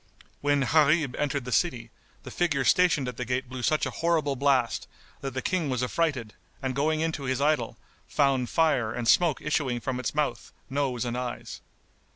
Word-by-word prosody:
When 145 0 +2
Gharib 150 -1 +3
entered 140 -3 -1
the 125 - -5
city, 120 -8 0 0.3
the - - -9
figure 145 -6 0
stationed 160 -6 +3
at 125 -2 -5
the 125 - -2
gate 125 +2 -2
blew 130 0 -6
such 155 +5 +1
a - - -3
horrible 160 -4 0
blast 135 -3 +1 0.3
that 135 -1 -5
the 130 - -2
King 175 -6 0
was 125 -1 -1
affrighted 125 -5 -1 0.3
and 130 -1 -2
going 155 +3 +1
into 160 -3 -2
his 130 0 -1
idol, 145 -6 +1 0.3
found 135 -4 +1
fire 140 -9 +2
and 120 0 -3
smoke 170 0 +3
issuing 140 -5 0
from 125 +1 -3
its 130 - -3
mouth, 145 -6 -1 0.2
nose 130 -3 -1
and 120 0 -2
eyes. 125 -1 -5
135 Hz, 185 wpm, -27 LUFS, 125-150 Hz, 0.3 s, Gharib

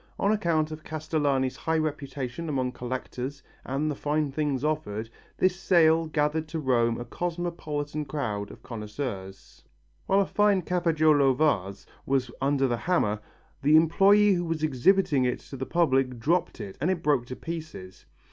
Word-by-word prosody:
On 200 - +2
account 165 -7 +1
of 155 0 -8
Castellani's 145 -4 -1
high 160 0 -1
reputation 145 -1 -3
among 130 -3 -1
collectors 130 +2 -5 0.2
and 145 +4 -1
the - - -4
fine 150 0 -1
things 145 -2 -1
offered, 115 -8 -2 0.3
this 185 -1 +2
sale 165 -3 +3
gathered 155 +1 0
to 160 +1 -4
Rome 120 -5 +1
a 120 - -5
cosmopolitan 155 -2 -3
crowd 110 -8 -3
of - - -13
connoisseurs. 105 -4 -7 0.4
While 195 +1 +4
a - - +1
fine 205 -1 +2
Cafaggiolo 155 -6 +3
vase 100 -10 0 0.2
was 130 -3 0
under 135 0 +2
the 120 -2 -1
hammer, 115 - 0 0.4
the 150 +3 +4
employé 195 +6 +5
who 175 0 -1
was 165 -1 -3
exhibiting 150 0 +3
it 125 0 -1
to - - -10
the 130 0 -5
public 135 -7 +1
dropped 165 +9 0
it 95 - -8
and 160 - +1
it 185 -3 -1
broke 145 -5 +2
to 125 - -6
pieces. 160 - -8
150 Hz, 155 wpm, -27 LUFS, 130-165 Hz, 0.4 s, employé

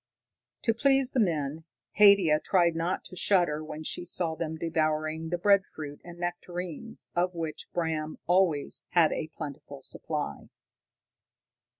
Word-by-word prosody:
To 225 - +3
please 270 +2 +3
the 260 - 0
men, 160 -6 0 0.4
Haidia 200 -7 +7
tried 170 -2 +2
not 170 +3 -1
to - - -10
shudder 175 -5 +2
when 155 0 -7
she 155 - -2
saw 175 -1 0
them 160 0 -4
devouring 155 0 -1
the 175 - -1
breadfruit 175 -6 +1
and 175 0 -10
nectarines 175 +3 -5
of 180 +1 +1
which 160 -2 -5
Bram 160 -2 -2
always 175 -5 +1
had 170 -3 +5
a 155 - -2
plentiful 140 -2 -8
supply. 150 - -5
165 Hz, 130 wpm, -28 LUFS, 155-180 Hz, 0.4 s, Haidia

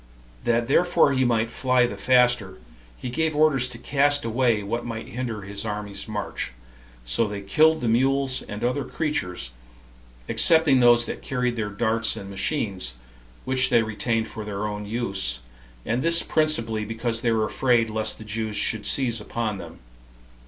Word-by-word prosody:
That 120 0 +1
therefore 160 0 +3
he 130 -1 +2
might 115 -1 +1
fly 125 0 +2
the 120 - -4
faster, 125 -7 +2 0.4
he 125 - -6
gave 160 +3 0
orders 145 -5 +3
to 125 - -9
cast 145 +2 +1
away 115 -2 +1
what 115 +4 -3
might 115 -1 -6
hinder 115 -4 -4
his 100 +1 -5
army's 105 -2 -5
march; 105 - -4 0.5
so 85 - +1
they 100 -1 -5
killed 155 +11 +3
the 120 - -1
mules 135 +3 +2
and 105 0 -7
other 125 +3 0
creatures, 90 - -3 0.8
excepting 160 -5 +4
those 120 -1 +5
that - - -6
carried 125 -3 -1
their 110 -3 -3
darts 110 +2 0
and 100 0 -8
machines, 95 - -2 0.5
which 130 0 +1
they 115 - +4
retained 110 +1 -1
for 110 - -7
their 105 0 -4
own 105 0 -5
use, 100 - -2 0.5
and 120 +3 -1
this 165 +2 +5
principally 115 -9 +1
because 115 +1 -3
they 115 - +1
were 110 -1 +1
afraid 120 +1 +2
lest 110 0 -1
the - - -10
Jews 110 0 -3
should 110 0 0
seize 120 -5 +1
upon 110 -2 -3
them. - - -10
115 Hz, 165 wpm, -24 LUFS, 105-130 Hz, 0.8 s, those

